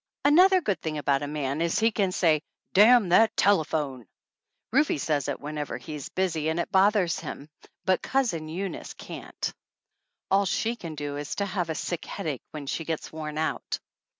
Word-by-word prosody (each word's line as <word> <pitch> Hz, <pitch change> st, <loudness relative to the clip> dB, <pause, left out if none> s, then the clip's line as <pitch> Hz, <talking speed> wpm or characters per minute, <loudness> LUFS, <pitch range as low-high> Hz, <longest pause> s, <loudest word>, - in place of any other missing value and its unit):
Another 365 Hz, +6 st, +6 dB
good 195 Hz, -, -1 dB
thing 155 Hz, -1 st, -3 dB
about 140 Hz, -1 st, +1 dB
a 145 Hz, -, -3 dB
man 145 Hz, 0 st, -2 dB
is 170 Hz, 0 st, +1 dB
he 225 Hz, +1 st, +3 dB
can 200 Hz, -3 st, +1 dB
say, 160 Hz, -5 st, +3 dB, 0.3 s
"Damn 215 Hz, 0 st, +7 dB
that 220 Hz, +5 st, +5 dB
telephone!" 150 Hz, -, +1 dB, 0.6 s
Rufe 275 Hz, -, +3 dB
says 145 Hz, -1 st, 0 dB
it 145 Hz, -, -2 dB
whenever 150 Hz, 0 st, -4 dB
he's 145 Hz, +3 st, -7 dB
busy 165 Hz, -5 st, 0 dB
and 160 Hz, +2 st, -1 dB
it 170 Hz, -, -2 dB
bothers 190 Hz, -2 st, +3 dB
him, 140 Hz, -, -7 dB, 0.4 s
but 185 Hz, -1 st, +2 dB
Cousin 225 Hz, -13 st, 0 dB
Eunice 190 Hz, +4 st, -5 dB
can't. -, -, -6 dB, 0.8 s
All 200 Hz, +1 st, +4 dB
she 230 Hz, +6 st, 0 dB
can 165 Hz, -8 st, -7 dB
do 145 Hz, -1 st, -4 dB
is 145 Hz, 0 st, -4 dB
to 200 Hz, -, -1 dB
have 175 Hz, -5 st, -2 dB
sick 175 Hz, -, -3 dB
headache 145 Hz, -6 st, -4 dB
when 150 Hz, -2 st, -7 dB
she 155 Hz, +4 st, -3 dB
gets 160 Hz, -1 st, -4 dB
worn 155 Hz, -1 st, -5 dB
out. 160 Hz, 0 st, -1 dB
165 Hz, 175 wpm, -27 LUFS, 150-200 Hz, 0.8 s, Damn